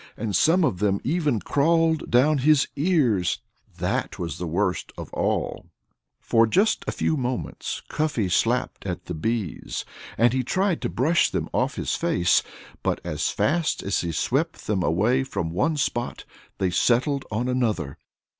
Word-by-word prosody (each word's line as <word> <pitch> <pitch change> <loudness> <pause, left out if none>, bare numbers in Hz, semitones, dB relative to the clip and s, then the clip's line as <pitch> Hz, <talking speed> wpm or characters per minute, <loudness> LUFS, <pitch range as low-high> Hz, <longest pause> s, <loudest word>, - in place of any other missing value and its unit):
And 105 -3 -2
some 170 - +4
of 125 - 0
them 100 -1 +1
even 145 - 0
crawled 160 +2 +2
down 140 +5 +4
his 145 +1 +4
ears. 140 - +2 0.4
That - - -2
was 85 -1 -4
the 90 - -3
worst 90 +2 -1
of - - -8
all. - - -1 0.8
Just 200 - +2
for - - -2
a - - 0
few 160 - 0
moments 130 -3 -3
Cuffy 150 -10 -1
slapped 115 +4 0
at 90 0 -4
the 90 - -5
bees. 105 +2 -3 0.3
And 120 +1 +4
he 130 0 +1
tried 185 - 0
to 120 - -1
brush 155 +8 +2
them - - -3
off - - 0
his - - -2
face. 85 0 +2 0.4
But - - 0
as - - -1
fast 160 +2 0
as 100 -2 0
he 85 - -2
swept - - -1
them 100 -3 0
away 110 +11 +2
from 95 -11 -3
one 155 - 0
spot 120 -3 -2 0.3
they 95 -2 0
settled 130 - +2
on 115 +3 -1
another. 110 - -1
120 Hz, 160 wpm, -24 LUFS, 95-150 Hz, 0.8 s, some